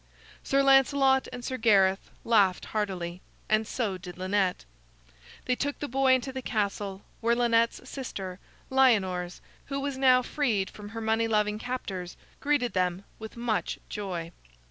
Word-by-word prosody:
Sir 275 0 +2
Lancelot 270 0 +4
and 245 -1 -7
Sir 260 - -3
Gareth 195 -5 +3 0.2
laughed 200 -6 +3
heartily, 185 -4 -3 0.3
and 215 0 +2
so 205 -8 -2
did 180 -1 -9
Lynette. 185 - 0 0.8
They 250 - +1
took 285 +2 -2
the 290 - -4
boy 265 0 +4
into 260 +1 -3
the 260 - -4
castle, 200 -4 -2 0.2
where 235 +1 +2
Lynette's 235 +1 +2
sister, 195 -9 -6 0.3
Lyonors, 190 -9 +2 0.2
who 275 0 -3
was 275 -1 -3
now 255 -1 +5
freed 235 -10 0
from 205 -1 -10
her 225 +1 -6
money 225 +1 +1
loving 210 -1 +1
captors, 195 -8 -5 0.2
greeted 285 -4 +1
them 180 0 0 0.2
with 220 +1 -9
much 235 -3 -1
joy. 180 -5 -4
220 Hz, 145 wpm, -28 LUFS, 190-255 Hz, 0.8 s, now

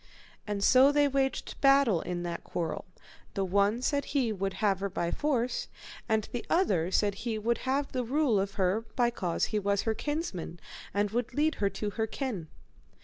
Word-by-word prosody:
And 205 -1 -2
so 260 +6 +7
they 290 0 +4
waged 270 -1 -1
battle 275 -9 +5
in 175 -1 -4
that 170 -1 -4
quarrel, 170 +2 -3 0.5
the 195 - 0
one 200 +5 +2
said 285 +1 +1
he 260 -6 0
would 195 -1 -2
have 200 -3 +1
her 200 0 -2
by 175 -2 -2
force, 255 -5 0 0.4
and 220 -1 +1
the 240 -2 -3
other 190 - +2
said 205 +1 +2
he 220 +2 -3
would 235 +2 0
have 275 +1 0
the 255 -1 -1
rule 255 -3 +2
of 195 +1 -2
her, 195 +3 +1
by 240 -1 +3
cause 180 -7 -1
he 210 - +2
was 200 0 +1
her 225 - +1
kinsman, 220 - -4 0.3
and 205 +1 0
would 240 +1 -2
lead 310 +2 +2
her 200 - +3
to 205 +1 -4
her 220 +1 -1
kin. 220 - -4
220 Hz, 190 wpm, -30 LUFS, 195-265 Hz, 0.5 s, so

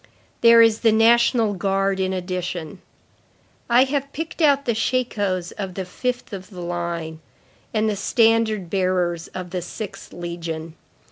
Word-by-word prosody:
There 230 0 +8
is 225 -1 +3
the 225 - +4
National 230 0 +4
Guard 195 0 0
in 190 0 0
addition. 180 -1 -4 0.9
I 240 +2 +6
have 280 +1 -2
picked 325 +3 -5
out 280 -2 +4
the 235 - +1
shakos 210 -6 -1
of 190 -3 -4
the 190 - -4
fifth 245 +5 -4
of 190 -1 -7
the 180 -4 -9
line, 170 -2 -4 0.5
and 215 0 +1
the 210 - 0
standard 220 -2 +2
bearers 180 -2 0
of 180 -1 -6
the 180 -1 -2
sixth 205 +3 -8
legion. 165 -2 -6
195 Hz, 145 wpm, -22 LUFS, 180-230 Hz, 0.9 s, There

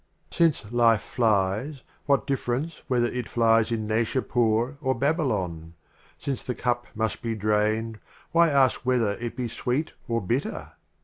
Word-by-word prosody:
VIII. - - -21 0.2
Since 110 -6 -12
Life 115 -2 +4
flies, 110 +5 0 0.2
what 140 -1 +3
difference 140 +4 -2
whether 125 -3 +2
it 125 -1 -3
flies 115 -1 +3
in 110 -2 -1
Naishapiir 115 +2 +1
or 130 -2 +1
Babylon? 100 - -1 0.4
Since 135 -3 -3
the 125 - -4
Cup 120 -1 -1
must 110 0 -2
be 115 -1 -2
drained, 110 +1 0 0.3
why 170 0 +5
ask 135 -3 +3
whether 125 -4 +1
it 120 -1 -5
be 125 -1 -2
Sweet 125 +6 -2
or 115 0 0
Bitter 120 +8 -3
120 Hz, 145 wpm, -26 LUFS, 110-130 Hz, 0.4 s, why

